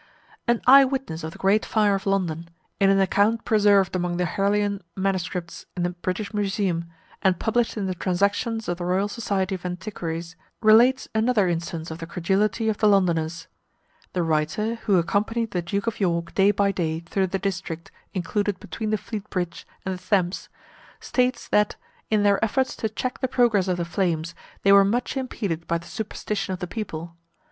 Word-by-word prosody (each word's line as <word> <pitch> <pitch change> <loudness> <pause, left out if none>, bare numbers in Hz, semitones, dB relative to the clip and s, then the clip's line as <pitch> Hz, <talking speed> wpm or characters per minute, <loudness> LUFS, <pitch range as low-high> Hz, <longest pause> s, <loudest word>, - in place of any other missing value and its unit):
An 235 -1 +2
eye 275 +2 +9
witness 260 - -3
of 160 - -4
the - - -12
great 200 +3 +3
fire 210 -2 +2
of 195 0 -2
London, 170 -4 -1 0.3
in 195 - +5
an 195 0 +4
account 205 +4 +2
preserved 205 -4 +4
among 175 -1 -1
the 180 - +1
Harleian 200 +3 0 0.2
Mss. 180 -3 -2
in 175 - 0
the 175 - 0
British 185 +4 -4
Museum, 195 -4 0 0.4
and 185 -2 +3
published 230 +3 0
in 205 - -1
the 185 - -1
transactions 200 +5 0
of 175 0 -2
the - - -3
Royal 185 +3 +1
Society 200 -3 -2
of 185 - -5
Antiquaries, 180 -2 -5 0.2
relates 235 +4 +5
another 220 -2 +2
instance 165 -1 -3
of 160 - -7
the 165 - -6
credulity 195 +6 0
of 215 -2 0
the 215 - +4
Londoners. 165 -5 +2 0.7
The 180 - 0
writer, 160 +8 0
who 200 -3 +5
accompanied 215 +6 0
the 180 - -1
Duke 200 +5 -2
of 230 - -2
York 170 -3 0
day 195 +1 +4
by 200 -1 +2
day 165 -4 -2
through 190 +3 -1
the 195 +2 -1
district 185 -4 -4 0.2
included 200 +2 -1
between 220 -1 -5
the 215 - +1
Fleet 210 0 -7
bridge 175 -2 -4 0.2
and 190 - -1
the 180 - -8
Thames, 185 -2 0 0.5
states 250 0 0
that, 210 0 +2 0.3
in 215 -1 +2
their 200 0 +3
efforts 260 +4 +1
to 220 - -1
check 250 +4 -4
the 260 - 0
progress 235 -7 +2
of 180 -1 0
the 170 - -2
flames, 170 -2 -1 0.3
they 195 - +5
were 200 0 +8
much 235 +8 0
impeded 200 -11 -3
by 170 - +1
the 170 - -11
superstition 210 -1 -4
of 185 - -5
the - - -3
people. 170 -5 -6
195 Hz, 185 wpm, -24 LUFS, 175-215 Hz, 0.7 s, eye